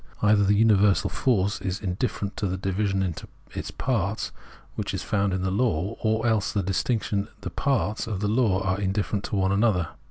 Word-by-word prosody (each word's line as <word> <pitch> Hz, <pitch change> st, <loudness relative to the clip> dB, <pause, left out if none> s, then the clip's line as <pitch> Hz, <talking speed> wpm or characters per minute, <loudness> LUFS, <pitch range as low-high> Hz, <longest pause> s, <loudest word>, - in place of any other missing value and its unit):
Either 105 Hz, 0 st, +5 dB
the 100 Hz, +1 st, +3 dB
universal, 105 Hz, -2 st, +4 dB
force, 100 Hz, -6 st, +1 dB
is 95 Hz, 0 st, -2 dB
indifferent 100 Hz, +1 st, -2 dB
to 100 Hz, -, -1 dB
the 95 Hz, 0 st, -2 dB
division 95 Hz, +1 st, 0 dB
into 90 Hz, -4 st, -4 dB, 0.5 s
parts, 110 Hz, -4 st, -1 dB, 0.4 s
which 100 Hz, -2 st, -3 dB
is 95 Hz, -, -3 dB
found 100 Hz, -2 st, +1 dB
in 95 Hz, 0 st, -1 dB
the 95 Hz, -, 0 dB
law, 100 Hz, -2 st, 0 dB
or 110 Hz, +1 st, +1 dB
else 110 Hz, -4 st, +2 dB
the 100 Hz, -, 0 dB
distinctions, 100 Hz, +2 st, 0 dB
the -, -, -5 dB
parts 120 Hz, -5 st, 0 dB
of 105 Hz, -4 st, -3 dB
the 105 Hz, -, 0 dB
law, 105 Hz, -4 st, +2 dB
are 95 Hz, +1 st, 0 dB
indifferent 100 Hz, +1 st, -1 dB
to -, -, -3 dB
one 95 Hz, -1 st, +2 dB
another. 100 Hz, -5 st, +2 dB
100 Hz, 185 wpm, -26 LUFS, 95-110 Hz, 0.5 s, Either